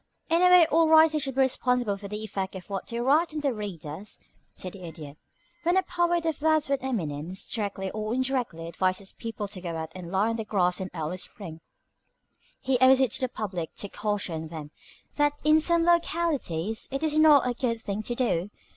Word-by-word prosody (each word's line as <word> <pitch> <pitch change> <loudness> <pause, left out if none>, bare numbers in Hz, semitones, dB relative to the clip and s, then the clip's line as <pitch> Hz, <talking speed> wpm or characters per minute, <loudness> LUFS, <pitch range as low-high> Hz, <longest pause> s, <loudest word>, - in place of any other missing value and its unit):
"In 335 +1 +4
a 360 - +6
way 360 -2 +8
all 325 +1 +3
writers 315 -1 +6
should 270 -2 -2
be 270 - +3
responsible 250 -4 +1
for 200 0 -8
the 210 +2 -5
effect 195 -2 -4
of 190 +1 -9
what 195 - -4
they 235 -1 -4
write 300 +6 +2
on 305 - -2
their 280 -3 0
readers," 195 -3 -7 0.3
said 185 - -7
the 195 - -11
Idiot. 155 -4 -9 0.5
"When 345 +2 +2
a 380 - +3
poet 345 -1 0
of 320 -3 -2
Wordsworth's 305 -3 +2
eminence, 175 - -2
directly 200 -3 -3
or 215 0 -4
indirectly, 255 -11 -2
advises 185 +3 -1
people 225 -2 -5
to 190 -3 -6
go 170 -2 -4
out 160 0 -5
and 180 -2 -8
lie 195 +4 +2
on 230 - -2
the 220 - -3
grass 185 -3 0
in 185 - -4
early 160 +2 -3
spring, 175 -4 -7 1.0
he 260 -2 +1
owes 260 0 +7
it 260 -4 +2
to - - -3
his 255 - 0
public 185 -6 -4
to 205 - -5
caution 200 -7 -3
them 155 -2 -8 0.5
that 290 0 +3
in 305 +1 +5
some 335 +1 +3
localities 310 - 0
it 275 +3 -3
is 310 -1 +1
not 300 -4 +6
a 245 - 0
good 235 -2 -1
thing 205 -1 -3
to 240 +3 -3
do. 205 -7 0
220 Hz, 205 wpm, -27 LUFS, 185-290 Hz, 1.0 s, way